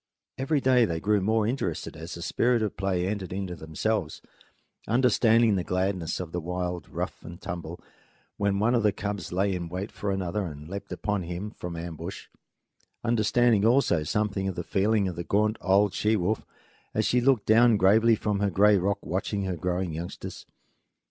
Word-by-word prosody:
Every 140 +3 +1
day 130 -3 +4
they 85 -5 -2
grew 105 +2 +2
more 110 +2 +2
interested 125 +5 -2
as 80 +3 -7
the 85 - -7
spirit 120 +3 +2
of 105 - -2
play 95 -2 0
entered 95 -1 -3
into 95 -1 -4
themselves, 80 +3 -2 0.7
understanding 115 -2 +4
the 90 - -1
gladness 90 -1 -1
of 90 -3 -5
the 90 - -2
wild 90 0 -4
rough - - -5
and 85 +1 -9
tumble 85 -1 -6 0.6
when 100 -1 +1
one 110 +4 +2
of 120 - +3
the 105 -1 +3
cubs 100 -3 -4
lay 95 +2 +1
in 85 -2 -4
wait 95 +4 -4
for 105 - -4
another 95 +1 -1
and 75 -1 -9
leaped 100 +3 -7
upon 105 -2 -1
him 90 +4 -5
from 90 -5 -7
ambush; 85 +2 -6 0.8
understanding 115 -1 +3
also 115 - +3
something 100 +4 -1
of 95 - -3
the 90 - -3
feeling 100 +2 +1
of 90 - -4
the 85 - -4
gaunt 105 +4 +1
old 95 +1 +3
she 105 +2 +1
wolf 105 +2 0 0.5
as - - +1
she 125 - +2
looked 125 -5 +3
down 115 0 +5
gravely 110 +4 +5
from 105 -1 -1
her 100 0 +1
gray 105 +1 +5
rock 100 +3 0
watching 100 +2 -2
her 95 -2 -2
growing 90 0 -2
youngsters. 85 +3 -7
100 Hz, 180 wpm, -27 LUFS, 90-110 Hz, 0.8 s, down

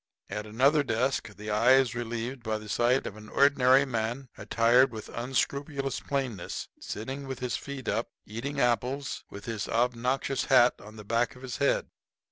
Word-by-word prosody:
At 105 +1 -4
another 135 +8 +3
desk 115 -3 -1
the 105 +2 -6
eye 115 +5 +5
is 130 -4 +4
relieved 120 +2 -4
by 110 -2 -2
the 110 0 -10
sight 120 +5 +2
of 100 - -5
an 105 0 -12
ordinary 140 -1 +5
man, 120 +1 -3
attired 120 +3 +3
with 110 -2 -8
unscrupulous 135 +3 -2
plainness, 130 -10 -3
sitting 135 +6 -5
with 130 -1 -4
his 125 -1 -2
feet 140 -2 -6
up, 115 +3 0 0.2
eating 130 +7 -4
apples, 125 +3 0
with 100 - -10
his 115 -3 -3
obnoxious 125 +3 0
hat 125 -2 +6
on 105 +1 -12
the 105 -1 -10
back 115 +3 0
of 125 - -14
his 130 -2 -5
head. 140 - +1
125 Hz, 170 wpm, -28 LUFS, 115-135 Hz, 0.2 s, hat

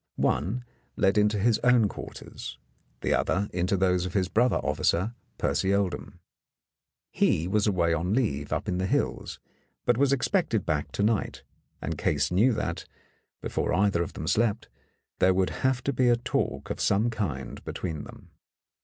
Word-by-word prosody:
One 110 +11 0 0.3
led 95 +2 +3
into 105 0 +3
his 110 +2 +2
own 125 -3 +4
quarters, - - -8 0.4
the - - +1
other 100 +2 +1
into 90 +2 +1
those 90 -1 +2
of 90 - -8
his 95 -2 +1
brother 120 +3 +3
officer, 100 +8 0 0.2
Percy 95 +1 +1
Oldham. 100 -3 -2 0.9
He 80 +2 +2
was 105 +2 +1
away 85 -4 +2
on 90 +5 0
leave 75 - -1
up 75 +6 -2
in 90 -2 -1
the 95 - 0
hills, - - -1 0.5
but 120 0 +2
was 140 -1 +4
expected 140 - +1
back 75 -3 -1
to 100 - 0
night, 110 0 0 0.4
and - - -3
Case - - +1
knew 105 +9 +4
that, - - -3 0.6
before - - -1
either 95 -2 +2
of 85 - -3
them - - -6
slept, 115 -1 +1 0.5
there 95 0 +4
would 95 0 +1
have 130 -1 +1
to 140 - 0
be 125 0 +3
talk - - -1
of - - -4
some 105 +4 +2
kind 70 - -4
be - - -5
tween 80 -5 -4
them. - - -13
100 Hz, 165 wpm, -27 LUFS, 90-115 Hz, 0.9 s, own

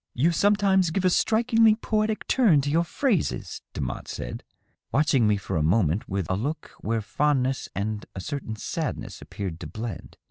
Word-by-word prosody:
"You 155 +8 +3
sometimes 195 -1 +3
give 185 +3 -1
a 185 - +4
strikingly 225 +1 +4
poetic 215 -1 -1
turn 205 - +4
to 145 +1 -2
your 165 +3 +3
phrases," 200 - -1
Demotte - - -4
said, - - -6 0.5
watching 135 -5 +3
me 105 -1 +3
for 100 - -3
a - - +1
moment 85 +2 +1
with 95 -1 -1
a - - 0
look 140 +11 -4
where 115 +1 -1
fondness 135 +1 0
and 105 +1 -2
a - - -4
certain 135 0 -4
sadness - - -4
appeared 95 -5 -6
to - - -6
blend. 110 -6 -7
145 Hz, 170 wpm, -26 LUFS, -, 0.5 s, a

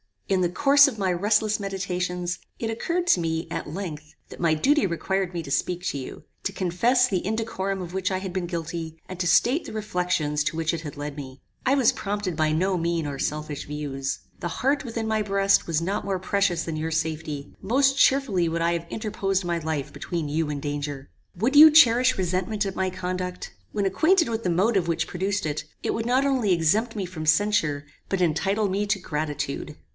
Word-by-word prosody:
"In 190 -1 +2
the 175 - +2
course 280 - +6
of 255 -6 -4
my 190 -3 +1
restless 210 +4 +2
meditations, 180 -2 -3 0.2
it 225 - -3
occurred 340 +10 -1
to 190 - +5
me, 160 0 -2
at - - -4
length, 155 -3 -6
that - - -11
my 170 -2 +3
duty 265 - +3
required 185 +2 -1
me 170 -1 -3
to 140 - -8
speak 180 +4 -1
to - - -1
you, 130 - -8 0.2
to 195 - -2
confess 215 +8 +2
the 190 -6 -1
indecorum 195 -2 -2
of 175 -1 -7
which 190 -1 0
I 185 - 0
had 190 -1 -5
been 180 -1 -2
guilty, 165 -1 -5
and 185 -1 -7
to 175 - 0
state 255 - +3
the - - -8
reflections 180 -8 -1
to - - -1
which 165 0 0
it 165 - -3
had 150 -4 -7
led 145 0 -5
me. 130 -2 -9 0.2
I 265 +2 +4
was 260 -5 +4
prompted 200 -4 -3
by 155 -1 +2
no 185 +4 +1
mean 170 -1 -1
or 140 -2 -4
selfish 150 0 -3
views. 140 -2 -4 0.2
The - - -3
heart 275 - 0
within 230 -1 -3
my 220 -1 +1
breast 195 -1 +2
was 165 -1 0
not 195 +4 -2
more 195 -1 0
precious 190 -2 0
than 160 -2 -4
your 160 +1 -2
safety: 155 -2 -3
most 270 +5 +2
cheerfully 225 -11 +3
would 165 +1 -2
I 170 +1 +2
have 170 0 -3
interposed 195 -3 -1
my 170 -1 -1
life 155 -3 -3
between 165 -4 -4
you 155 +1 0
and 145 -1 -3
danger. 145 -1 -4 0.3
Would 240 +10 +1
you 310 +1 +11
cherish 255 -4 +6
resentment 185 +3 -1
at 195 -1 -4
my 190 0 +1
conduct? 180 0 -4 0.2
When 205 -2 0
acquainted 330 - +3
with 230 0 -2
the - - +2
motive 190 +1 +2
which 165 -1 0
produced 195 +1 -2
it, 150 0 -3 0.2
it - - 0
would 225 - -2
not 260 +3 +3
only 255 -8 +2
exempt 205 +8 +1
me 200 -3 -2
from 170 -3 -6
censure, 155 -4 +2 0.2
but 195 -2 0
entitle 195 +6 +1
me 200 +2 -1
to 200 - +1
gratitude. 150 -3 -4
180 Hz, 210 wpm, -25 LUFS, 160-210 Hz, 0.3 s, you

